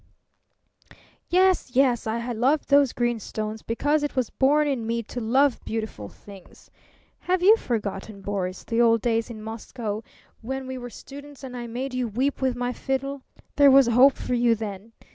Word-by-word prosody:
"Yes, 365 -8 +2
yes! 250 -4 +3
I 235 +2 -2
loved 260 +6 +1
those 280 -3 +5
green 240 -1 -1
stones 215 +1 -5
because 290 +6 0
it 290 - -3
was 255 -3 -1
born 295 +3 +3
in 250 -6 -2
me 230 0 -1
to 245 - -6
love 260 +4 +2
beautiful 215 - -5
things. 195 -3 -16 0.5
Have 365 0 -1
you 420 +4 +8
forgotten, 210 - -4
Boris, 190 -2 -3
the 230 0 0
old 230 -2 +3
days 230 0 0
in 215 -2 -8
Moscow, 220 -1 -5 0.4
when 265 +3 -4
we 260 0 -6
were 245 0 -7
students 285 +4 -12
and 255 -2 -7
I 240 -1 -5
made 250 +3 -5
you 255 -1 -1
weep 260 +7 -1
with 260 -2 +1
my 245 0 -2
fiddle? 270 +2 -3 0.4
There 285 -1 +7
was 270 0 +7
hope 255 +4 +6
for 250 - -4
you 240 -1 +3
then. 210 0 -7
245 Hz, 175 wpm, -25 LUFS, 225-275 Hz, 0.5 s, you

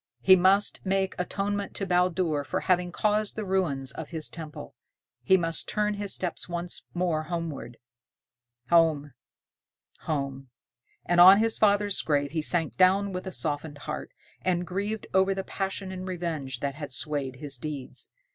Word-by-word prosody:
He 190 - +8
must 190 +3 +3
make 190 0 0
atonement 200 +2 -2
to 195 - -1
Baldur 180 -4 +1
for 140 - -2
having 180 -1 +1
caused 210 +2 +1
the 215 - -4
ruin 180 -8 0
of 160 - -7
his 160 -3 -3
temple. 155 - -8 0.5
He 190 +10 +5
must 165 -2 -1
turn 210 0 0
his 205 -1 -3
steps 180 -1 -2
once 175 0 -3
more 170 -3 0
homeward. 160 -7 -5 0.9
Home! 160 -4 +4 0.9
Home! 135 -3 -3 0.6
And 175 0 +4
on 190 +2 +10
his 225 +1 +1
father's 205 -1 +3
grave 145 -2 0
he 160 0 -1
sank 165 0 -1
down 190 +2 +4
with 185 +1 -5
a - - -4
softened 150 -3 -3
heart, 150 +1 -6 0.3
and 180 -1 0
grieved 200 +4 -3
over 190 +1 +3
the 195 - -3
passion 195 0 -3
and 185 0 -6
revenge 160 -8 -4
that 140 -1 -1
had 145 0 -7
swayed 140 -1 -1
his 140 -1 -6
deeds. 145 -2 -3
175 Hz, 155 wpm, -27 LUFS, 150-190 Hz, 0.9 s, on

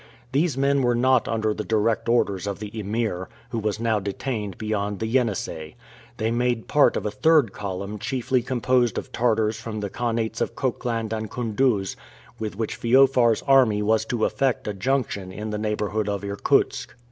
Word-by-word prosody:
These 145 +1 +1
men 140 0 +2
were 120 -1 +2
not 130 +1 +3
under 110 -1 0
the 105 - -4
direct 110 +1 0
orders 100 -5 +1
of 100 - -3
the 105 -1 -7
Emir, 105 -3 -2 0.2
who 115 - -1
was 105 0 -2
now 115 -2 +1
detained 105 0 -4
beyond 105 -2 -2
the 110 - -3
Yenisei. 110 -10 -1 0.4
They 110 +1 0
made 120 -1 0
part 145 - +4
of - - -4
a 105 - -1
third 150 -1 +3
column 100 +2 -5
chiefly 130 +2 0
composed 125 -1 +1
of - - -5
Tartars 110 -2 +1
from 110 -2 -5
the 100 -2 -4
khanats 115 -1 -2
of - - -1
Khokland 115 -3 -2
and 110 -1 -3
Koondooz, 115 -4 0 0.4
with 110 -2 -4
which 110 +1 -3
Feofar's 125 -2 +4
army 125 -7 +4
was 110 +1 +2
to 115 -1 0
affect 135 -6 0
a 105 - -1
junction 100 -4 -1
in 105 +3 -5
the 105 - -3
neighborhood 105 0 -1
of 100 -1 -2
Irkutsk. 100 +2 0
110 Hz, 175 wpm, -24 LUFS, 105-125 Hz, 0.4 s, part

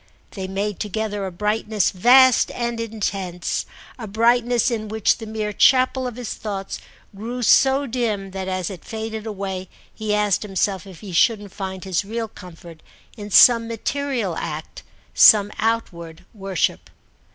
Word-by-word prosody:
They 190 -2 -6
made 200 +1 -3
together 210 -1 -3
a - - -6
brightness 210 +1 0
vast 250 +6 +5
and 235 -1 -3
intense, 200 -5 -3 0.3
a 220 - -6
brightness 235 +3 +2
in 215 -2 -3
which 220 +2 +1
the 225 - -8
mere 215 -1 -3
chapel 255 +2 +3
of 245 - -6
his 245 -2 -5
thoughts 195 -3 -5 0.4
grew 240 +5 -5
so 270 +4 +4
dim 220 -6 -2
that 190 0 -5
as 185 0 -3
it 185 - -10
faded 220 0 -6
away 190 -3 -5 0.2
he 215 -1 -2
asked 210 -2 +1
himself 195 -1 -2
if 185 -4 -13
he 205 -3 -8
shouldn't 205 +3 +1
find 190 -1 -6
his 190 -1 -1
real 225 +3 -4
comfort 170 -5 -13 0.3
in 210 -3 -8
some 230 +3 +6
material 230 -4 -2
act, 155 -1 -6 0.3
some 205 -1 +7
outward 175 -8 -3
worship. 195 -5 -2
210 Hz, 150 wpm, -21 LUFS, 190-230 Hz, 0.4 s, some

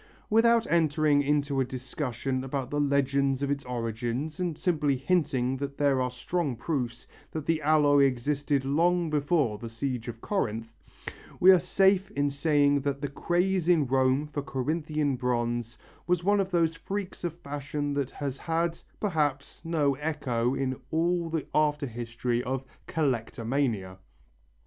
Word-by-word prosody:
Without 230 +1 +5
entering 155 -3 +3
into 145 -1 +1
a - - +3
discussion 130 0 -3
about 135 -1 -3
the 145 - 0
legend 140 -1 +1
of 140 - 0
its 140 -1 -2
origin, 120 +4 -3
and 175 -4 -2
simply 150 -6 +1
hinting 135 -4 +1
that 140 0 -5
there 140 -2 +2
are 125 - 0
strong 135 +3 -2
proofs 120 -2 -3 0.2
that 155 -2 -5
the 160 -1 +1
alloy 145 -2 +5
existed 140 +2 0
long 170 +4 +2
before 145 -7 +1
the 115 - -6
siege 125 +1 -3
of 115 -1 -6
Corinth, 115 - -2 0.7
we 185 - +8
are 185 - +6
safe 195 +2 +3
in 145 0 +1
saying 145 0 +3
that 140 0 -2
the 145 - -2
craze 175 +5 0
in 165 -5 +4
Rome 130 +2 +2
for 150 -1 -4
Corinthian 150 +1 -1
bronze 120 -2 -1 0.3
was 180 -1 +1
one 205 +2 +3
of 190 -1 0
those 165 -3 +2
freaks 195 +3 -5
of 170 -2 -2
fashion 145 -1 -4
that 140 -2 -1
has 140 -2 -5
had, 165 0 -1 0.2
perhaps, 150 -9 -1
no 155 -4 +1
echo 135 -4 -1
in 130 -1 -1
all 170 +1 +1
the 160 -2 -2
after 150 -1 +2
history 120 0 -2
of 130 +1 -3 0.2
"collectomania." 115 -7 -1
145 Hz, 150 wpm, -28 LUFS, 130-160 Hz, 0.7 s, we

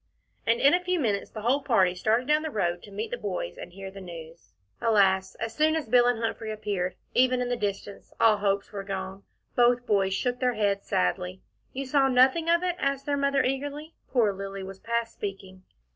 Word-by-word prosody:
And 230 +1 +3
in 280 - +5
a 360 0 +2
few 360 -1 0
minutes 210 -8 -1
the 215 - -8
whole 265 +5 +2
party 195 -10 +3
started 220 +7 +1
down 300 +1 +3
the 315 - -3
road 175 - -1
to 205 - -13
meet 210 +3 -4
the 245 - -2
boys 180 - -4
and 175 - -9
hear 195 +1 -8
the 195 0 -10
news. 165 - -11 0.3
Alas! 190 -4 +3
as 225 0 -4
soon 310 +3 +2
as 315 -6 -2
Bill 245 +1 +5
and 245 -1 +2
Humphrey 225 -1 -3
appeared, 205 -4 -2 0.2
even 255 0 +3
in 250 0 -1
the 245 - +1
distance, 205 -2 -5
all 220 -2 +5
hopes 200 -1 -1
were 200 -2 -5
gone. 190 0 -5 0.3
Both 245 0 +3
boys 195 -3 +2
shook 245 +4 -1
their 250 -2 +1
heads 200 -2 0
sadly. 90 +1 -1 0.3
"You 275 +1 -4
saw 270 +1 +3
nothing 265 +6 +4
of 340 +1 +3
it?" 360 -1 -1
asked 275 0 -1
their 290 - 0
Mother 280 -1 +2
eagerly. 290 +4 -3 0.2
Poor 225 -6 +3
Lilly 195 0 -6
was 190 0 -9
past 235 +1 -2
speaking. 190 -2 -7
220 Hz, 210 wpm, -27 LUFS, 195-260 Hz, 0.3 s, in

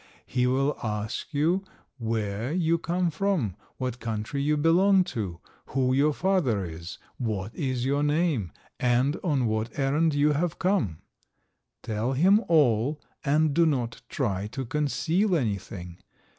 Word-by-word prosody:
He 125 0 +1
will 135 +3 +1
ask 110 +4 -3
you 165 +6 +1 0.4
where 110 +1 -2
you 170 -1 +1
come 175 +1 0
from, 160 - 0 0.2
what 125 -1 -3
country 115 +4 -3
you 150 +2 +2
belong 185 +5 +4
to, 95 -7 -4 0.3
who 130 -1 +1
your 145 +3 +4
father 150 - +1
is, 85 +1 -8 0.2
what 110 -4 -3
is 130 -4 -2
your 140 +2 +1
name, 150 - +1 0.3
and 125 +5 +2
on 145 -8 +1
what 110 +1 -2
errand 145 +3 +2
you 145 +1 +4
have 160 +3 -1
come. 180 - 0 0.8
Tell 110 +4 -1
him 190 - +4
all, 145 -3 +3 0.2
and 150 +1 +2
do 170 +2 +4
not 125 -6 -1
try 105 -8 -1
to 130 +5 -5
conceal 160 - +1
anything. 100 - -3
135 Hz, 140 wpm, -27 LUFS, 110-160 Hz, 0.8 s, belong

